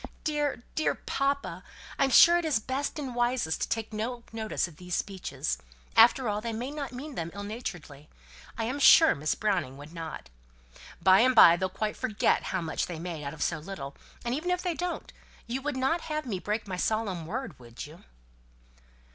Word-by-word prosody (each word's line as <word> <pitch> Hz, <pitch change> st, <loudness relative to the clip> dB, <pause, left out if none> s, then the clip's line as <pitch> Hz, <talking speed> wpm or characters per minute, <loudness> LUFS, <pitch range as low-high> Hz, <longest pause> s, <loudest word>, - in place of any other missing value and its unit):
Dear, 295 Hz, -5 st, -1 dB
dear 310 Hz, -, +1 dB
papa, 280 Hz, 0 st, -2 dB, 0.4 s
I'm 275 Hz, -, +4 dB
sure 340 Hz, +7 st, +8 dB
it -, -, -4 dB
is 300 Hz, -8 st, +2 dB
best 265 Hz, +7 st, -3 dB
and 270 Hz, -4 st, -4 dB
wisest 240 Hz, -8 st, 0 dB
to -, -, -1 dB
take 225 Hz, -1 st, -2 dB
no 235 Hz, +3 st, -3 dB
notice 220 Hz, -4 st, -1 dB
of 160 Hz, -4 st, -15 dB
these 180 Hz, 0 st, -4 dB
speeches. 180 Hz, -, -3 dB, 0.4 s
After 240 Hz, +2 st, +6 dB
all, 210 Hz, 0 st, -1 dB
they 230 Hz, 0 st, -3 dB
may 245 Hz, +5 st, -4 dB
not 290 Hz, -2 st, -5 dB
mean 275 Hz, +4 st, -7 dB
them 165 Hz, -7 st, -4 dB
ill 200 Hz, -, -5 dB
naturedly. 175 Hz, -, -7 dB, 0.5 s
I 225 Hz, -, -1 dB
am 255 Hz, +6 st, -2 dB
sure 320 Hz, +3 st, +8 dB
Miss 150 Hz, +2 st, -1 dB
Browning 160 Hz, -11 st, -1 dB
would 145 Hz, +3 st, -11 dB
not. 165 Hz, -, -7 dB, 0.7 s
By 190 Hz, 0 st, +7 dB
and 255 Hz, +2 st, +4 dB
by 170 Hz, -6 st, +9 dB
they'll 185 Hz, +2 st, -1 dB
quite 215 Hz, +3 st, -3 dB
forget 210 Hz, -1 st, +1 dB
how 185 Hz, -, -1 dB
much 160 Hz, -1 st, -2 dB
they 175 Hz, -, -5 dB
made 165 Hz, -2 st, -5 dB
out 140 Hz, -, -5 dB
of -, -, -2 dB
so 165 Hz, -, -1 dB
little, 150 Hz, -5 st, -7 dB, 0.3 s
and 240 Hz, -, 0 dB
even 315 Hz, +7 st, -2 dB
if 360 Hz, 0 st, 0 dB
they 355 Hz, -2 st, 0 dB
don't, 355 Hz, +2 st, -4 dB, 0.3 s
you 250 Hz, +3 st, -3 dB
would 285 Hz, -1 st, -2 dB
not 270 Hz, +6 st, +1 dB
have 305 Hz, -1 st, -3 dB
me 205 Hz, -7 st, -3 dB
break 210 Hz, +3 st, -3 dB
my 185 Hz, -2 st, -4 dB
solemn 195 Hz, -5 st, -1 dB
word, 220 Hz, -, -5 dB
would 120 Hz, -1 st, -9 dB
you?" 155 Hz, +4 st, -14 dB
220 Hz, 195 wpm, -29 LUFS, 175-270 Hz, 0.7 s, by